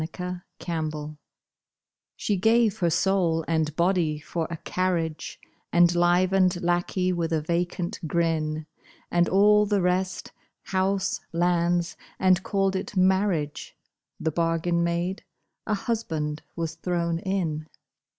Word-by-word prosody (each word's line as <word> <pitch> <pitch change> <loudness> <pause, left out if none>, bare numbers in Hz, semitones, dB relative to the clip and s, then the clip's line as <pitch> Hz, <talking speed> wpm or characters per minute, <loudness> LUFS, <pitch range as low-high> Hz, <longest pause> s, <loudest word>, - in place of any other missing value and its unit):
THE 180 +2 -5 0.3
WATCHER 155 -2 -3 1.0
She 205 - -1
gave 220 +2 +3
her 175 - +2
soul 170 -2 +1
and 160 -2 0
body 170 -3 +1
for 160 +2 -3
a 170 - -4
carriage, 165 -3 -2 0.3
And 175 0 +5
livened 180 +1 +3
lackey 175 +1 +1
with 170 -1 -2
a 160 - +2
vacant 175 +1 -2
grin, 155 -2 0 0.5
And 175 0 +3
all 210 +2 +5
the 205 -1 +2
rest—house, 185 +1 -2
lands—and 175 +2 +1
called 195 -1 0
it 190 +1 -4
marriage: 185 -5 +1 0.4
The 160 - -1
bargain 170 +1 +1
made, 170 +3 -1 0.4
a 215 - +1
husband 160 -10 -2
was 165 -2 -3
thrown 170 -1 -1
in. 170 -5 -2
175 Hz, 110 wpm, -26 LUFS, 165-190 Hz, 1.0 s, And